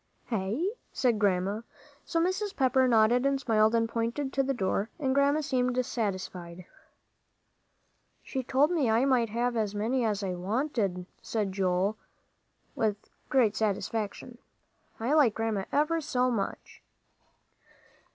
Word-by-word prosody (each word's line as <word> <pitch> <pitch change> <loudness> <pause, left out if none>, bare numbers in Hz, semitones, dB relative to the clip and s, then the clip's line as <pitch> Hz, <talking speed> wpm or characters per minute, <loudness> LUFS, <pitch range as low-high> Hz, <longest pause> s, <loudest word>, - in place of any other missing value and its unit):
"Hey?" 225 - -1 0.2
said 240 -5 +1
Grandma. 200 +1 +1 0.4
So 330 - 0
Mrs. 375 +4 -1
Pepper 260 -1 +3
nodded 235 +1 +4
and 275 0 +1
smiled 220 -3 +3
and 230 0 +2
pointed 235 +5 -2
to 275 - +2
the 270 0 0
door, 200 -2 -1
and 270 -5 0
Grandma 280 +2 +3
seemed 255 -3 0
satisfied. 185 -6 -4 1.6
"She 265 - -3
told 270 +5 +2
me 300 -9 +1
I 225 +4 +3
might 250 -4 +2
have 240 +2 -1
as 210 -2 -1
many's 220 -1 0
I 190 -2 -2
wanted," 195 -1 -1 0.2
said 210 -4 -2
Joel, 190 +2 0 0.8
with 210 -2 -2 0.2
great 240 -7 +3
satisfaction. 220 +3 -2 0.6
"I 235 +6 0
like 280 -9 +4
Grandma 220 -4 -1
ever 315 +3 +1
so 255 -4 +1
much." 205 -5 -4
230 Hz, 130 wpm, -29 LUFS, 205-265 Hz, 1.6 s, nodded